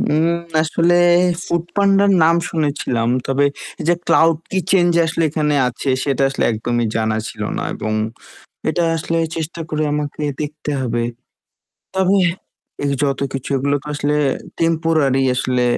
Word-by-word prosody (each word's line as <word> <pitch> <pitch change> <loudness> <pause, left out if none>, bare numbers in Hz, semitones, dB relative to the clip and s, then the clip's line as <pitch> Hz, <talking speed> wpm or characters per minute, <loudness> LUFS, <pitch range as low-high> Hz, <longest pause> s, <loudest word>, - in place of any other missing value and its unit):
উম 155 +2 +2 0.4
আসলে 165 +2 +2 0.5
ফুড 170 -1 -1
পান্ডার 200 0 +4
নাম 165 +1 +5
শুনেছিলাম, 140 -7 -1 0.2
তবে 135 +1 +2 0.4
এই 155 - -4
যে 175 - +5
ক্লাউড 165 -1 +4 0.2
কিচেন 185 -1 +2
যে 170 - +4
আসলে 165 0 -1
এখানে 150 -1 0
আছে 130 +2 -3
সেটা 140 -2 0
আসলে 135 - -1
একদমই 120 +2 -1
জানা 110 -1 0
ছিল 105 - -7
না - - -2
এবং 110 - -3 0.8
এটা 170 +2 +1
আসলে 165 +1 -1 0.2
চেষ্টা 165 +1 -4
করে 155 -1 -1
আমাকে 150 0 -3 0.2
দেখতে 150 0 -4
হবে। 120 -2 -1 0.9
তবে 190 +1 +3 0.7
এই 140 - +1
যতকিছু 135 -1 -2
এগুলো 140 +2 +1
তো - - -15
আসলে 145 0 0 0.5
টেম্পোরারি 160 -5 +2
আসলে। 125 0 0
150 Hz, 140 wpm, -19 LUFS, 135-165 Hz, 0.9 s, নাম